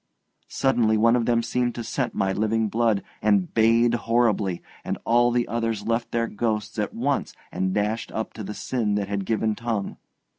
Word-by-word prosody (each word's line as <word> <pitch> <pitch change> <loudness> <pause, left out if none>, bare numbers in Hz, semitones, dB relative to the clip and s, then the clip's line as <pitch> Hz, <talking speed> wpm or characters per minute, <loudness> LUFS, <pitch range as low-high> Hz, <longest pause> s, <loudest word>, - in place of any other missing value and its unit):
Suddenly 115 -5 +2
one 115 +2 +4
of 120 -2 0
them 115 -1 +2
seemed 120 +1 -1
to 120 - -4
scent 125 +2 -2
my 95 -1 +1
living 110 +1 0
blood, 110 -2 +1 0.2
and 100 -4 +2
bayed 115 +1 +4
horribly, 115 -6 +1 0.2
and - - -3
all 120 +1 +4
the 120 0 +1
others 115 -3 -2
left 115 +1 -1
their 115 0 0
ghosts 110 -1 -2
at 105 - -1
once 135 +4 -1 0.2
and 95 0 -1
dashed 105 +3 -1
up 110 - -4
to 110 - -7
the 105 +2 -6
sin 110 -5 -1
that 100 -1 -1
had 100 -1 -2
given 110 -1 +1
tongue. 115 -3 -3
115 Hz, 185 wpm, -24 LUFS, 105-120 Hz, 0.2 s, one